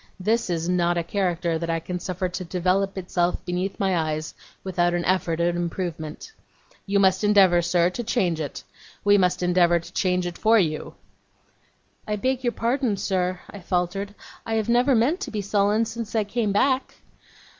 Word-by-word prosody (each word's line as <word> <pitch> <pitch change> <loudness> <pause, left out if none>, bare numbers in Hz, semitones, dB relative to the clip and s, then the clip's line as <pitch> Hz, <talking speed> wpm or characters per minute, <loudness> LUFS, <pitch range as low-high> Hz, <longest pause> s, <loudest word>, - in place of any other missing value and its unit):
This 220 +3 0
is 170 -1 -1
not 175 -1 +1
a 170 - 0
character 175 -3 -1
that 170 0 -4
I 165 0 0
can 180 +2 -5
suffer 185 +1 -3
to 180 +1 -5
develop 185 +3 0
itself 180 -1 -1
beneath 180 +2 -3
my 190 -2 +1
eyes 155 -1 -2 0.3
without 175 -2 +1
an 175 - -1
effort 175 -3 +1
at 170 0 +1
improvement. 170 - -4 0.6
You 200 0 +2
must 190 0 +3
endeavour, 195 -4 +5
sir, 175 +1 +2
to 240 - -4
change 185 -8 0
it. 145 - -6 0.4
We 205 0 +5
must 180 -1 +1
endeavour 175 -1 +4
to 170 - -13
change 180 -1 +1
it 175 0 -5
for 225 +1 +5
you.' 155 -7 -1 1.1
'I 210 - 0
beg 255 +4 -1
your 240 - +1
pardon, 235 -2 0
sir,' 185 -1 -1
I 205 - -9
faltered. 190 +3 -2 0.3
'I 225 - -2
have 220 0 -1
never 245 +3 +4
meant 260 +11 +2
to 400 - -5
be 215 - -4
sullen 205 +2 +2
since 225 0 -6
I 220 - +3
came 210 +1 -1
back. 260 +6 +1
185 Hz, 180 wpm, -24 LUFS, 175-210 Hz, 1.1 s, endeavour